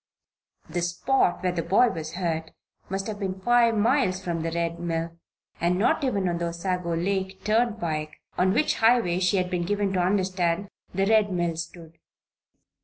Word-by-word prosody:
The 175 +2 -2
spot 175 +4 +1
where 180 - +2
the 175 -1 -2
boy 200 +9 +4
was 160 -5 -5
hurt 165 -3 -2 0.4
must 195 +1 -2
have 215 -2 -5
been 190 -2 -3
five 235 +2 +3
miles 220 -4 +2
from 170 -3 -3
the 165 - -1
Red 170 0 -2
Mill, 165 -1 -3 0.4
and 175 +2 +1
not 215 +7 +2
even 200 -8 0
on 170 -1 -1
the 170 - -1
Osago 170 0 -2
Lake 190 +2 -2
turnpike, 210 -9 0 0.2
on 185 +1 +3
which 305 - +2
highway 225 -6 +3
she 185 +2 +2
had 180 -1 -1
been 180 -1 0
given 200 +1 0
to 185 - +1
understand 185 0 0 0.2
the 195 +1 +1
Red 215 -1 +3
Mill 175 -2 0
stood. 165 0 -8
185 Hz, 175 wpm, -26 LUFS, 170-205 Hz, 0.4 s, boy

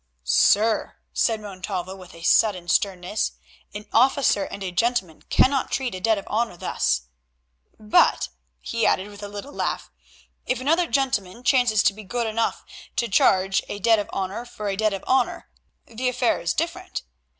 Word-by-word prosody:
"Sir," 210 - +3 0.2
said 225 -2 +1
Montalvo, 190 -2 -5
with 185 -3 -13
a 165 - -12
sudden 185 -1 +3
sternness, 185 +2 0 0.4
"an 210 +1 -8
officer 255 -4 +3
and 200 - -7
a 185 - -3
gentleman 195 -5 0
cannot 270 0 +3
treat 260 -5 -1
a 185 - -5
debt 220 +3 +2
of 200 - -6
honour 220 -4 -1
thus; 65 - 0 0.8
but," 215 +11 +3 0.3
he 230 -1 -3
added 195 0 +2
with 205 0 -12
a 205 - -5
little 205 +8 -8
laugh, - - -3 0.6
"if 255 - 0
another 325 +6 +2
gentleman 245 -7 -1
chances 245 -5 +3
to - - +4
be 215 +2 -10
good 235 +4 -2
enough 225 +1 -1 0.3
to 235 - 0
charge 195 -1 +3
a - - -4
debt 225 +2 +4
of 205 - -4
honour 195 +4 -3
for 215 -4 -6
a 195 - -1
debt 215 +1 +1
of 195 -1 -5
honour, 265 - 0 0.4
the 245 +2 -2
affair 250 -1 +1
is 165 -1 -1
different. 340 +3 -3
215 Hz, 170 wpm, -24 LUFS, 195-245 Hz, 0.8 s, to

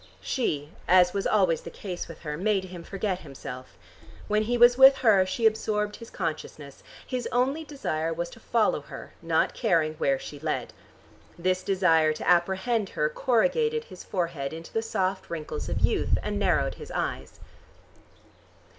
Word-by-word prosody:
She, 150 - -2 0.2
as 180 0 +5
was 200 -1 -1
always 185 -6 +2
the - - -8
case 180 -3 -6
with 165 - -11
her, 150 -2 -4
made 195 +3 +1
him 180 -2 -9
forget 195 0 -3
himself. 130 - -9 0.5
When 210 0 +2
he 240 +3 0
was 240 +1 +7
with 265 +1 +8
her, 195 -4 +5
she 190 +5 -1
absorbed 210 -1 +1
his 230 - -11
consciousness: 155 -5 -5 0.2
his 250 -2 -3
only 270 +6 +1
desire 165 - -3
was 170 +1 -3
to - - -13
follow 225 -1 +1
her, - - -10
not - - +1
caring 165 -9 +1
where 135 -3 +2
she 145 +2 -9
led. 155 +1 -3 0.6
This 185 +1 0
desire 165 -6 +3
to - - -6
apprehend 190 +5 +2
her 150 - 0
corrugated 450 - +1
his 485 - -12
forehead 165 -7 -3
into 165 +1 -9
the 225 - +1
soft 190 -4 -2
wrinkles 160 -2 -5
of - - -2
youth, - - +2
and - - -2
narrowed - - +1
his - - -8
eyes. - - -4
185 Hz, 165 wpm, -27 LUFS, 165-225 Hz, 0.6 s, with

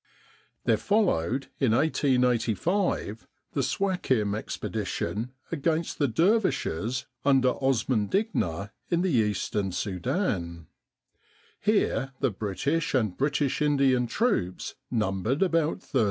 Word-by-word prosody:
There - - +4
followed, 140 - +1
in 130 -5 +3
1885, 125 - +1 0.3
the - - +1
Suakin 130 - 0
Expedition 110 +2 -3 0.2
against 165 +1 -1
the 145 - +3
dervishes 130 - +1 0.2
under 135 -2 +4
Osman 125 -4 +1
Digna 100 - -1 0.2
in 170 0 +1
the 190 - +1
Eastern 105 -4 0
Sudan. 90 - -2 0.9
Here 135 - +1
the - - +1
British 125 +12 -1
and 110 -8 +1
British 145 0 0
Indian 135 -4 +3
troops 115 - -1 0.2
numbered 110 - 0
about 165 -4 +1
13,000. 135 - -1
130 Hz, 100 wpm, -27 LUFS, 105-160 Hz, 0.9 s, There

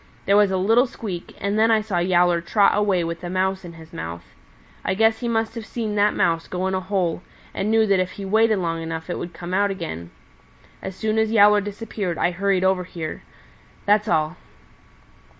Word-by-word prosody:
There 200 - +3
was 205 -1 +5
a 190 - 0
little 225 +7 +3
squeak, 190 -7 -7
and 200 +2 -1
then 225 +1 +4
I 220 -1 +4
saw 205 -5 -2
Yowler 175 -1 +3
trot 200 +4 +3
away 200 -4 +2
with 170 +1 -5
a 175 - -4
Mouse 190 +1 -1
in 175 -1 -9
his 160 -1 -14
mouth. 85 +1 -6 0.6
I 190 - 0
guess 220 +1 +3
he 240 - -3
must 225 -1 0
have 230 - -6
seen 220 -1 -4
that 210 0 +2
Mouse 165 -1 +1
go 185 +1 -3
in 190 - -1
a 190 - +1
hole 185 -3 -1 0.3
and 200 - -2
knew 220 0 +4
that 200 -3 +3
if 185 0 -1
he 200 - -7
waited 220 +2 +3
long 165 -3 -2
enough 165 +1 -5
it - - -3
would 175 - -5
come 175 +1 -7
out 200 +1 +2
again. 125 - -5 0.7
As 190 - -6
soon 220 +2 0
as 220 0 +1
Yowler 210 -1 +6
disappeared 205 -3 -4
I 175 - +1
hurried 190 +1 0
over 190 -1 +2
here. 165 -3 -6 0.6
That's 210 +1 +3
all." 155 -5 0
190 Hz, 210 wpm, -22 LUFS, 175-210 Hz, 0.7 s, Yowler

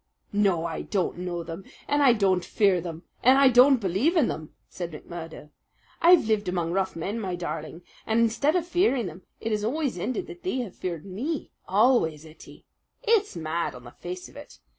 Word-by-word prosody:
"No, 195 -5 +2
I 165 -1 -3
don't 185 -3 -2
know 175 -1 -3
them, 165 +3 -7 0.2
and 290 0 +2
I 265 -4 +6
don't 190 -5 +2
fear 190 0 +2
them, 165 0 -7 0.2
and 260 +2 +6
I 275 -1 +7
don't 255 +2 +7
believe 205 - +1
in 295 - +4
them!" 155 -1 -6
said 175 -2 -6
McMurdo. 160 -1 -9 0.5
"I've 345 -4 +7
lived 215 -3 +1
among 175 -2 -1
rough 190 +1 -1
men, 195 +7 -3
my 190 -4 -3
darling, 165 0 -6 0.2
and 220 +1 +2
instead 230 +8 +2
of 350 -2 +1
fearing 345 - +2
them 180 +1 -8 0.2
it 225 - -3
has 210 -1 0
always 270 - -1
ended 255 - -2
that 355 - -11
they 365 -7 -2
have 210 -7 -7
feared 170 -3 -5
me 255 - -4 0.2
always, 190 - +3
Ettie. 155 0 -15 0.4
It's 435 -3 +2
mad 165 -1 -2
on 125 - -11
the 120 - -11
face 180 +5 -7
of - - -18
it! 290 +1 -12
195 Hz, 195 wpm, -26 LUFS, 170-260 Hz, 0.5 s, I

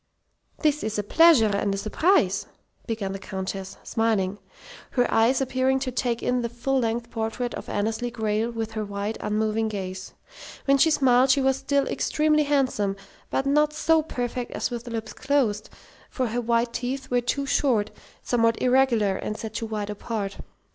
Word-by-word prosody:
"This 300 -1 +2
is 215 0 -2
a 210 - 0
pleasure 230 -5 +5
and 200 0 0
a - - -4
surprise," 215 - +2 0.4
began 215 -4 -2
the 195 - -5
Countess, 190 0 -5
smiling, 205 -3 0 0.5
her 245 -2 +3
eyes 235 +4 +3
appearing 260 0 +1
to 260 -1 -2
take 240 -1 -1
in 250 0 +1
the 235 - -2
full 255 +3 -1
length 235 0 -2
portrait 230 +2 -3
of - - -7
Annesley 220 +4 -1
Grayle 220 -1 -1
with 225 -1 -4
their 215 -1 -2
wide, 205 +1 -4
unmoving 215 +1 0
gaze. 190 -2 -6 0.5
When 275 0 +4
she 320 - +5
smiled 265 -3 +4
she 260 - +5
was 265 0 +2
still 280 +1 +1
extremely 305 0 +1
handsome, 260 -9 +1 0.3
but 270 - -1
not 300 +2 +3
so 320 +1 +3
perfect 245 -4 -4
as - - -2
with 240 0 -5
lips 225 -2 -5
closed, 235 -8 0 0.4
for 260 - -1
her 240 +2 -1
white 235 0 +1
teeth 265 +1 -4
were 245 0 +3
too 275 +3 -1
short, 260 -6 +1 0.3
somewhat 230 -2 +2
irregular, 245 -6 +3
and 215 - -4
set 220 -1 -6
too 225 - -3
wide 210 -1 -3
apart. 205 -1 -4
235 Hz, 170 wpm, -25 LUFS, 215-265 Hz, 0.5 s, pleasure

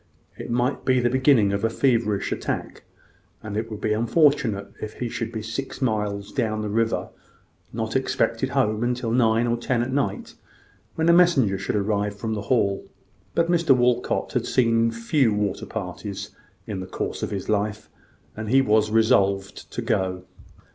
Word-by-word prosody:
It - - -8
might 120 +3 0
be 130 -1 +3
the 120 -1 +1
beginning 130 -6 +4
of 100 +1 -2
a 115 - +3
feverish 115 -5 +1
attack; - - -4 0.6
and 105 -2 -5
it 110 +1 -2
would 105 -2 -7
be 105 - +1
unfortunate 115 -4 +2
if 110 - -5
he 120 - -4
should 115 0 -4
be 110 -2 -5
six 115 +5 -5
miles 105 -5 -1
down 110 -5 -1
the 105 - -3
river 115 +2 0 0.6
not - - -3
expected - - 0
home 110 +4 +1
till 120 -2 -3
nine 115 -1 +3
or 120 0 0
ten 120 0 0
at 130 +2 -4
night, 140 0 -2 0.6
when 160 0 0
a 170 - +6
messenger 140 - +4
should 100 - -2
arrive 105 0 -1
from 110 +1 -3
the 105 - -3
Hall. 100 -6 +2 0.5
But 170 +1 +2
Mr 165 -6 +4
Walcot 125 0 +1
had - - -1
seen 115 -2 +3
few 115 0 +1
water 105 -2 -2
parties 100 0 -6 0.3
in 100 -3 -4
the 95 - -6
course - - -4
of - - -2
his 100 -2 -4
life, 105 0 -1 0.5
and 110 -1 -5
he 135 +3 +5
was 110 -4 +3
resolved 100 -3 +1
to - - -4
go. 95 -1 -1
110 Hz, 175 wpm, -24 LUFS, 105-125 Hz, 0.6 s, a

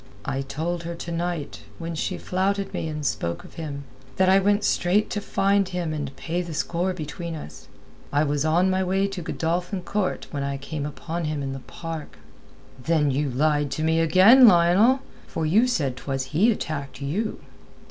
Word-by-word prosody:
"I 135 0 -1
told 160 +6 -3
her 170 0 -5
to 170 0 -6
night, 170 -2 -3 0.2
when 165 0 -5
she 160 - -2
flouted 195 +2 -1
me - - -2
and 150 -1 -4
spoke 85 -9 -2
of - - -14
him, 145 -4 -6 0.3
that 185 0 +3
I 190 +1 +6
went 205 +2 +2
straight 190 +4 +2
to 205 - -2
find 195 -1 +1
him 175 -3 -2
and 145 -3 -4
pay 170 +2 -2
the 170 -3 -6
score 175 +4 0
between 165 0 -5
us. 150 - -10 0.4
I 145 +1 +3
was 145 -1 0
on 175 +4 +3
my 190 0 +1
way 190 +2 +1
to 195 -2 -5
Godolphin 175 +3 -2
Court 200 +1 -1
when 145 - -3
I 140 0 -2
came 145 +1 -4
upon 165 +3 -4
him 150 -2 -2
in 135 -1 -3
the 135 - -6
park." 160 - -7 0.6
"Then 150 0 +2
you 140 +2 0
lied 145 +2 +1
to 155 - -2
me 160 +1 +2
again, 190 +10 +7
Lionel. 195 +8 +5 0.3
For 160 - -2
you 210 +11 +4
said 145 - 0
'twas 135 -1 -3
he 205 +10 +5
attacked 140 - -4
you." 180 +11 -2
165 Hz, 190 wpm, -25 LUFS, 145-185 Hz, 0.6 s, again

